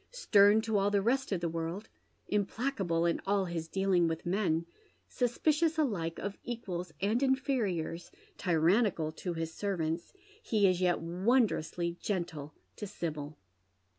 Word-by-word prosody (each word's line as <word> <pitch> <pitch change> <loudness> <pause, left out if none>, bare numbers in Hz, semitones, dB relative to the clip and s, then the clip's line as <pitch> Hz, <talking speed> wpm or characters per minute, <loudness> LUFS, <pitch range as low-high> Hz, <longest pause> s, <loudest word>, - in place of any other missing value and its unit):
Stem 215 - +4
CO 220 -2 0
all 200 +1 +2
the 205 0 +2
rest 255 +6 0
of 185 -3 0
the 170 - 0
world, 165 +5 -4 0.4
implacable 200 -4 0
in 170 - +1
all 200 -1 +2
his 170 -2 -4
dealing 190 -1 +2
with 165 0 -3
men, 175 -3 +1 0.4
suspicious 305 +6 +1
alike 190 - 0
of 200 0 -5
equals 185 -8 -5
and 215 +5 +1
inferiors, 235 - 0 0.3
tyi 175 -3 0
annical 165 -2 +2
to 180 - -3
hia 165 0 -2
servants, 165 -1 -3 0.3
he 215 - +2
is 185 -1 +1
yet 180 -1 +2
wondrously 175 -2 0
gentle 165 -7 -3 0.2
to 210 - -5
Sibyl. 155 -6 -5
190 Hz, 140 wpm, -31 LUFS, 165-220 Hz, 0.4 s, Stem